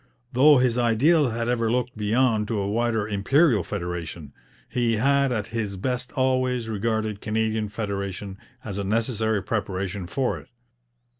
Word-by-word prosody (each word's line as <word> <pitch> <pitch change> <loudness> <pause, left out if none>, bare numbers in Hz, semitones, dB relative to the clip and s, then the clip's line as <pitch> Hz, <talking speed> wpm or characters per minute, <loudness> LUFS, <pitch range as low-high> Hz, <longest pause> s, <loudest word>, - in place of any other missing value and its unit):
Though 145 +4 +7
his 125 -1 +2
ideal 130 +6 +3
had 115 +1 -2
ever 115 -2 +1
looked 125 0 -1
beyond 110 0 +1
to 115 - -1
a 100 -1 -1
wider 110 0 0
Imperial 110 - +3
federation, 85 -4 -5 0.3
he 120 -2 0
had 140 +4 +2
at 110 -4 -1
his 105 -4 -2
best 125 +5 -2
always 130 -2 +1
regarded 110 -1 -2
Canadian 110 0 -1
federation 100 -2 -4 0.2
as 100 -2 -5
a - - -1
necessary 110 0 0
preparation 100 -3 -3
for 130 +7 -1
it. - - -16
110 Hz, 145 wpm, -25 LUFS, 100-125 Hz, 0.3 s, Though